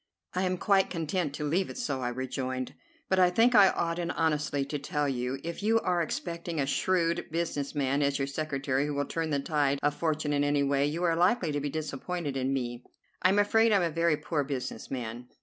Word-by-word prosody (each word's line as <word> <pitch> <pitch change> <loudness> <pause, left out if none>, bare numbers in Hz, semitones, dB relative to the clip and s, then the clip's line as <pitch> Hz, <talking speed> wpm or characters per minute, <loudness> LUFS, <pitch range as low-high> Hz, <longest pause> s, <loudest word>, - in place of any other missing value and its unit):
"I 185 - 0
am 185 0 0
quite 195 +1 +3
content 165 -1 -1
to 150 - -4
leave 170 +6 0
it - - -7
so," 140 - -2
I 125 - -1
rejoined, 130 0 -3 0.3
"but 190 - +2
I 180 -1 +6
think 230 +7 +4
I 200 -4 +8
ought 165 0 -1
in 170 -1 -2
honesty 150 -4 0
to 145 +1 -4
tell 145 +1 -1
you, 125 0 -2
if 170 +3 -5
you 225 +2 +3
are 180 -1 +1
expecting 170 0 -3
a 140 - +2
shrewd 170 +3 +1
business 160 -3 -2
man 140 0 +1
as 140 -1 +2
your 135 - 0
secretary 140 -1 -1
who 145 - -3
will 145 0 0
turn 165 +3 -2
the 145 -2 +1
tide 140 -1 +1
of 145 0 +2
fortune 155 -1 -1
in 145 0 +2
any 145 0 +2
way, 140 0 +2
you 165 +4 -2
are 170 -2 +3
likely 180 -1 +2
to 145 - -1
be 145 - -2
disappointed 155 +1 -4
in 130 0 0
me. 120 -2 -3 0.4
I 185 - +5
am 195 - +2
afraid 225 +2 +4
I - - +5
am 195 - +3
a 170 - 0
very 165 -1 +2
poor 150 -2 -1
business 135 -2 -5
man." 120 -1 -5
150 Hz, 230 wpm, -29 LUFS, 140-175 Hz, 0.4 s, I